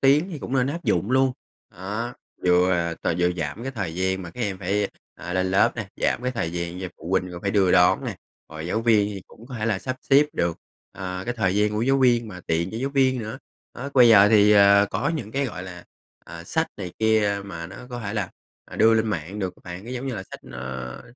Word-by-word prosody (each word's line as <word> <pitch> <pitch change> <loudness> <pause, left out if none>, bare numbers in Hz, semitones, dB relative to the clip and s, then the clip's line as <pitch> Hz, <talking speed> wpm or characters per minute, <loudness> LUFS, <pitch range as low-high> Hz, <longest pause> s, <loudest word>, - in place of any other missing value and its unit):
tuyến 145 +7 +4
thì 160 - -5
cũng 130 - -7
nên 130 -1 +2
áp 170 +5 -4
dụng 105 - +1
luôn. 130 0 +3 0.4
Đó, 105 +7 -5 0.3
vừa 90 +1 +4
là 85 -2 0
t - - -9
vừa 90 0 +3
giảm 80 +6 -4
cái 135 +2 -4
thời 95 -9 -4
gian 95 +1 -1
mà 85 - -8
các 125 - -9
em 100 -5 -2
phải, 100 +2 0 0.3
ờ, 90 - -7
lên 95 0 0
lớp 95 - +3
nè, - - -4
giảm - - 0
cái 125 0 -1
thời 85 -9 -2
gian 85 +1 -4
cho 95 - -4
phụ 85 - -8
huynh 95 -1 +1
coi 85 - -7
phải 100 - 0
đưa 95 -3 +3
đón 90 0 +4
nè, - - -4 0.3
rồi 80 +1 -7
giáo 110 +6 0
viên 110 -3 +3
thì 95 - -7
cũng 115 - -16
có 130 - -9
thể 110 - -1
là 110 -4 +1
sắp 130 +3 -4
xếp 145 +2 +6
được, 85 -1 -1 0.4
à, 90 -1 -5
cái 120 - -2
thời 95 -5 +1
gian 105 0 +3
của 105 +1 -1
giáo 135 +3 +3
viên 120 -3 +3
mà 90 -3 -9
tiện 85 +3 0
cho 110 - -6
giáo 135 +4 -2
viên 130 -2 +2
nữa. 110 +2 -5 0.4
Đó, 135 +3 -5
bây 125 -3 +7
giờ 105 -2 +8
thì, 105 -1 +6
ờ, 100 0 +6
có - - -1
những 110 -9 -5
cái, 140 +3 0
gọi 100 -6 -6
là, 90 -1 -9 0.4
à, 85 0 -10
sách 160 - 0
này 90 -4 -6
kia 110 -2 +2
mà 85 -4 -7
nó 95 +4 -11
có 120 -1 -5
thể 105 -1 -4
là, 100 -5 -2 0.3
à, - - -11
đưa 115 0 +5
lên 110 0 +2
mạng 95 -1 -3
được 95 -3 -3
á - - -21
bạn. 90 +2 -8
Nó 120 - -8
giống 130 +1 -4
như 130 - -2
là 95 - -5
sách, - - -11
ơ, 65 0 -6
100 Hz, 260 wpm, -24 LUFS, 90-120 Hz, 0.4 s, giờ